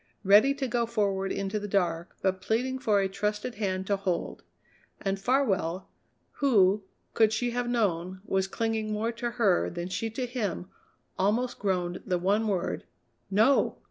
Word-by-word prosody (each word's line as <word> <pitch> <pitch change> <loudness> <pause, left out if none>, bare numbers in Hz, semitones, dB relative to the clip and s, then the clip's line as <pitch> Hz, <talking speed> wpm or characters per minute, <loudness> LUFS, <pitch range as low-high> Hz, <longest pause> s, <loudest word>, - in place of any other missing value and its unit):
Ready 210 +8 +6
to 275 -2 -2
go 235 -1 0
forward 200 -4 0
into 195 +2 -2
the 205 - -5
dark, 175 -4 -1
but 190 -1 +1
pleading 255 +5 -1
for 215 -6 +2
a 195 - +1
trusted 210 +4 -2
hand 190 -2 -1
to 200 0 +1
hold. 190 -3 -2 0.6
And 195 0 -2
Farwell, 195 -8 0 0.5
who, 210 -7 +4 0.3
could 220 -1 +4
she 240 +2 0
have 245 0 -2
known, 185 -6 0
was 190 -2 0
clinging 220 +1 -2
more 215 +2 -1
to 235 +1 -3
her 230 -7 +2
than 175 +1 -5
she 225 +5 -2
to 250 +3 -3
him, 215 -7 -3 0.5
almost 225 +6 +1
groaned 180 -3 -1
the 180 -2 0
one 200 +5 +1
word: 190 -4 -2 0.4
"No!" 220 +8 +3
205 Hz, 160 wpm, -28 LUFS, 190-235 Hz, 0.6 s, Ready